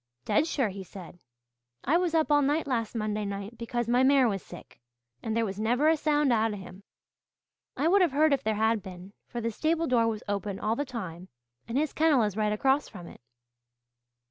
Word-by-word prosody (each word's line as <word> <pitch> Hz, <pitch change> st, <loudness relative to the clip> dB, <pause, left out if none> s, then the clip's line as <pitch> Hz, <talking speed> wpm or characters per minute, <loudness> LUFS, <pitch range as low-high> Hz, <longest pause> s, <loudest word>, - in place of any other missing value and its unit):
'Dead 305 Hz, +2 st, +2 dB
sure,' 265 Hz, -9 st, 0 dB
he 195 Hz, 0 st, -7 dB
said. 180 Hz, -1 st, -12 dB, 0.6 s
'I 305 Hz, +7 st, +3 dB
was 350 Hz, -2 st, 0 dB
up 315 Hz, -1 st, +2 dB
all 290 Hz, 0 st, +5 dB
night 290 Hz, +3 st, +1 dB
last 240 Hz, -4 st, -2 dB
Monday 215 Hz, -1 st, -2 dB
night 200 Hz, +2 st, -5 dB
because 235 Hz, 0 st, -3 dB
my 245 Hz, +2 st, +3 dB
mare 265 Hz, -1 st, +5 dB
was 195 Hz, -4 st, -2 dB
sick, 175 Hz, -, -13 dB, 0.4 s
and 225 Hz, 0 st, -2 dB
there 230 Hz, -, +2 dB
was 195 Hz, -1 st, -5 dB
never 245 Hz, +7 st, +2 dB
a 325 Hz, -, +4 dB
sound 295 Hz, -3 st, +2 dB
out 225 Hz, -1 st, +1 dB
of -, -, -5 dB
him. 185 Hz, 0 st, -11 dB, 1.0 s
I 300 Hz, -, +1 dB
would 390 Hz, +3 st, +4 dB
have 350 Hz, -5 st, +3 dB
heard 300 Hz, +2 st, +3 dB
if 275 Hz, -, 0 dB
there 220 Hz, -3 st, 0 dB
had 220 Hz, 0 st, +1 dB
been, 185 Hz, 0 st, -11 dB
for 240 Hz, -, -5 dB
the 230 Hz, 0 st, -2 dB
stable 320 Hz, +7 st, 0 dB
door 240 Hz, -5 st, +2 dB
was 220 Hz, -2 st, -3 dB
open 200 Hz, -1 st, -3 dB
all 220 Hz, +1 st, 0 dB
the 285 Hz, -, -2 dB
time 185 Hz, -9 st, -7 dB, 0.4 s
and 230 Hz, +3 st, -2 dB
his 305 Hz, +1 st, 0 dB
kennel 305 Hz, -6 st, +3 dB
is 210 Hz, -3 st, -1 dB
right 210 Hz, -1 st, 0 dB
across 270 Hz, +7 st, +1 dB
from 175 Hz, -, -10 dB
it!' -, -, -13 dB
230 Hz, 215 wpm, -28 LUFS, 205-285 Hz, 1.0 s, all